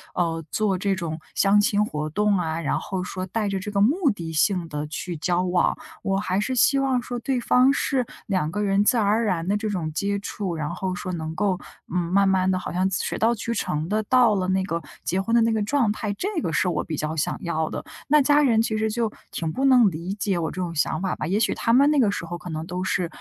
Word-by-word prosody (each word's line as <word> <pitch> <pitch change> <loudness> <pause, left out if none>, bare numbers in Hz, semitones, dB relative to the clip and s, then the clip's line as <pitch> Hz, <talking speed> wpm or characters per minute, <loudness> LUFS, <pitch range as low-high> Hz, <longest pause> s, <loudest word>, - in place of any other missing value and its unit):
呃， 165 -2 -1
做 210 -3 +1
这 195 +1 0
种 165 -4 -4 0.2
相 205 +1 +4
亲 205 0 +2
活 150 -5 -4
动 210 +5 +2
啊， 165 -2 -2
然 155 - 0
后 190 -2 -4
说 185 0 -4
带 210 +3 -1
着 195 -1 -1
这 205 +2 -5
个 200 - 0
目 290 - +3
的 165 -5 -6
性 175 +2 +1
地 150 -1 -4
去 170 +3 -5
交 175 +3 0
往。 180 -1 +1 0.2
我 195 0 0
还 195 -1 0
是 255 +5 -1
希 275 +3 +4
望 265 -2 +1
说 245 0 -5
对 255 +2 -1
方 250 +2 +4
是 270 -2 0 0.2
两 185 -6 0
个 210 +4 -2
人 200 0 +2
自 240 +4 +3
然 220 - +2
而 215 +3 +2
然 180 -6 -1
的 200 - +2
这 215 +1 -2
种 175 -6 -2
接 200 +5 -1
触， 195 -3 -4
然 150 -2 -3
后 185 +1 -3
说 185 +1 -5
能 160 -2 -4
够， 195 -1 +1 0.4
嗯， - - +1
慢 200 +1 +4
慢 190 -1 +2
地 185 - +2
好 - - -6
像 185 +2 +1
水 190 - -2
到 230 +2 +3
渠 230 +1 -3
成 155 -7 -2
地 215 +3 0
到 240 0 +4
了 185 -2 -1
那 190 0 +2
个 170 -3 -3 0.2
结 185 +3 0
婚 230 +4 -2
的 235 - +5
那 230 0 +3
个 220 - 0
状 240 +1 +1
态， 210 -1 -3
这 385 - -2
个 165 - -2
是 160 +4 +1
我 170 -4 0
比 155 - -5
较 155 +2 -2
想 150 - -1
要 160 -2 -1
的， - - -5 0.2
那 300 +1 +5
家 290 +2 +4
人 240 -6 +3
其 225 -1 -1
实 220 0 0
就 225 0 -1 0.2
挺 160 -2 -3
不 265 +11 -1
能 250 -5 +6
理 170 +4 -4
解 200 -3 -1
我 160 - -1
这 - - -10
种 175 -2 -3
想 155 +1 0
法 190 -1 -1
吧。 155 - -4
也 195 +5 +1
许 225 - +2
他 230 - 0
们 275 +4 +6
那 300 - +3
个 230 -6 +4
时 185 - -4
候 175 +1 -5
可 175 - -9
能 160 0 -4
都 180 +1 -4
是， 185 -1 0
195 Hz, 280 characters per minute, -24 LUFS, 175-220 Hz, 0.4 s, 能